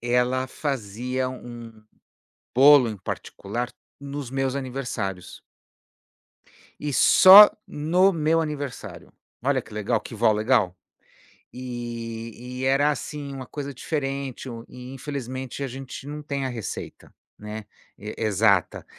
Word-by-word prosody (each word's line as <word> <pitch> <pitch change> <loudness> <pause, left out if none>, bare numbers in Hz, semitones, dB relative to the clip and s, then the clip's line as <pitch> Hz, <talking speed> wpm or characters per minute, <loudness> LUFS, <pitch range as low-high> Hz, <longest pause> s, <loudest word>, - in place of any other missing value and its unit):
ela 125 +2 +1
fazia 130 -1 -3
um 120 -2 -9 0.8
bolo, 140 -1 +7
em 110 - -5
particular, 115 +5 -5 0.3
nos 140 -2 -6
meus 135 0 -1
aniversários. 120 -9 -4 1.4
E 145 -1 -3
só 195 +8 +10 0.2
no 175 +6 +3
meu 165 0 +2
aniversário. 145 -4 -6 0.3
Olha 135 -1 +2
que 110 - -15
legal, 105 +2 0
que - - -9
vó 110 0 +4
legal. 105 -4 +2 0.8
E 120 0 -6
e - - -1
era 140 +3 +3
assim, 145 -1 -5
uma 130 -1 -7
coisa 140 -1 -6
diferente, 135 -2 -4
um 115 -1 -7
e 125 +1 -10
infelizmente 130 -1 -5
a 135 - -2
gente 135 +1 -8
não 150 +1 -6
tem 140 -2 -3
a - - -1
receita, 115 -4 -7 0.3
né, 105 0 -7 0.3
e 105 +2 -7
exata. 105 -3 +2
130 Hz, 125 wpm, -25 LUFS, 115-140 Hz, 1.4 s, só